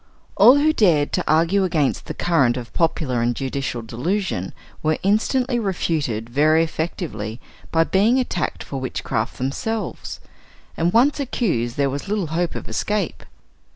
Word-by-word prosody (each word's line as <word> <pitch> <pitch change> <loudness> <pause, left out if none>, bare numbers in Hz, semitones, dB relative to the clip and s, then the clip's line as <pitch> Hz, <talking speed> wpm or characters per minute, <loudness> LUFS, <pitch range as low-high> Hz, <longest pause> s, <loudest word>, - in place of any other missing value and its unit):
All 250 - +8
who 310 +2 +3
dared 165 - +3
to - - +1
argue 170 +5 +3
against 160 -6 0
the - - -5
current 140 -8 +2
of 120 -2 -7
popular 150 -7 0
and 120 +1 +1
judicial 135 -3 -3
delusion 125 - -2 0.3
were 155 0 +1
instantly 240 +5 +1
refuted 155 - -1
very 155 +6 +3
effectively 155 - -4 0.3
by 165 0 +4
being 210 +9 +3
attacked 180 -10 -2
for 135 - -5
witchcraft 115 -2 -3
themselves; 175 - -3 0.6
and 170 +1 +1
once 260 +8 +3
accused, 170 - -1
there 140 -1 +1
was 140 +7 -5
little 205 -2 -1
hope 175 +1 -1
of - - -6
escape. 205 - -2
165 Hz, 145 wpm, -22 LUFS, 130-200 Hz, 0.6 s, All